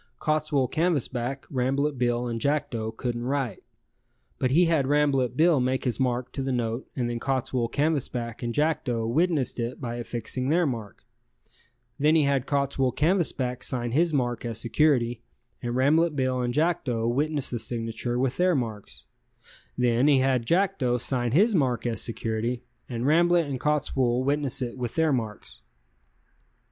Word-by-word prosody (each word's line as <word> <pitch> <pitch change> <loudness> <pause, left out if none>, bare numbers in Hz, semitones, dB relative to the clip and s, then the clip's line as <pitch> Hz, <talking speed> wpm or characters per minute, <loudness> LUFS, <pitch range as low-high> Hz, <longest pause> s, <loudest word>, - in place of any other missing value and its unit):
Cottswool 155 -3 +1
Canvasback, 135 -6 -1
Rambolet 135 +3 0
Bill 120 -1 0
and 115 -1 -3
Jackdo 120 -6 -1
couldn't 120 -1 -3
write, 130 -5 -2 0.8
but 130 - +1
he 165 +7 +4
had 160 -5 +2
Rambolet 140 -3 +2
Bill 160 -2 +4
make 130 +1 0
his 125 -1 -1
mark 125 -1 -1
to 135 - -4
the 135 0 -2
note 120 0 -2
and 125 -3 -1
then 120 0 -3
Cottswool 130 -2 -1
Canvasback 130 -6 -1
and 120 -1 -2
Jackdo 125 -5 0
witnessed 150 -1 +1
it 120 +2 -3
by 120 -3 -4
affixing 120 +2 -3
their 170 +3 +3
mark; 115 -7 -5 0.9
then 150 +3 +4
he 155 - +4
had 140 -2 +1
Cottswool 140 -3 0
Canvasback 145 -6 0
sign 120 -2 -1
his 165 +6 +3
mark 120 -5 -1
as 115 -2 -3
security 120 -2 +2 0.4
and 120 -1 -3
Rambolet 150 +5 +3
Bill 130 -2 0
and 120 -1 -1
Jackdo 130 -6 0
witness 145 +3 0
the 120 - -2
signature 115 +1 -3
with 130 0 0
their 180 -1 +3
marks; 110 -6 -5 0.7
then 125 +2 +2
had 130 -4 +3
Jackdo 170 -9 +1
sign 120 -1 0
his 205 - +4
mark 130 - +1
as 115 -2 -1
security 115 +1 -2 0.3
and 120 -1 -3
Rambolet 170 +3 +4
and 135 -3 -4
Cottswool 130 -4 +1
witness 140 -1 0
it 125 +1 -6
with 120 -2 -4
their 160 -2 +2
marks. 110 - -5
130 Hz, 155 wpm, -26 LUFS, 120-150 Hz, 0.9 s, he